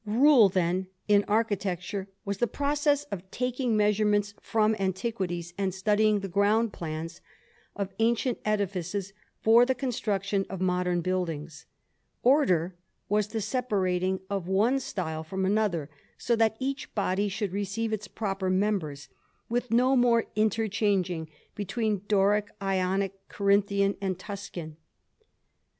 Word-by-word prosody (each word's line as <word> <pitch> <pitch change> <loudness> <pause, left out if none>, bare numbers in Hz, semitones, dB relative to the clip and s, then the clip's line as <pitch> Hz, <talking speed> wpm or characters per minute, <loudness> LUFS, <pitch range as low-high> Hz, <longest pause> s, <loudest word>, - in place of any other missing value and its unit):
Rule, 240 0 +6
then, 185 0 0 0.2
in 205 -1 +5
architecture, 200 -3 -1 0.2
was 200 -1 -3
the 240 - +2
process 290 +2 +1
of 190 -1 -6
taking 250 -1 -1
measurements 210 -1 +2
from 220 -1 +2
antiquities 190 -3 -2
and 190 -2 -1
studying 210 +1 +2
the 195 - -4
ground 205 +4 +2
plans 160 0 -6 0.5
of 200 -1 -4
ancient 235 +2 +1
edifices 195 -2 -2 0.3
for 230 +2 +6
the 260 +1 +1
construction 205 -6 -1
of 190 - -5
modern 180 -1 +1
buildings. 165 -4 -3 0.6
Order 190 - +3 0.3
was 210 0 +2
the 220 +1 -3
separating 190 -5 0
of 195 -3 -3
one 215 +8 +2
style 160 -10 -4
from 190 +4 -2
another, 195 -7 +1 0.3
so 240 - +1
that 225 -1 +2
each 275 +2 -4
body 200 0 0
should 200 -1 -3
receive 205 +3 -2
its 210 -1 -3
proper 195 -3 -2
members, 185 -7 -1 0.4
with 245 +1 -1
no 250 +3 +4
more 240 -2 +4
interchanging 205 -6 0 0.2
between 210 0 -1
Doric, 205 0 +3
Ionic, 195 0 0 0.2
Corinthian, 200 0 +2
and 190 -2 -1
Tuscan. 185 -5 -7
200 Hz, 125 wpm, -28 LUFS, 185-220 Hz, 0.6 s, Rule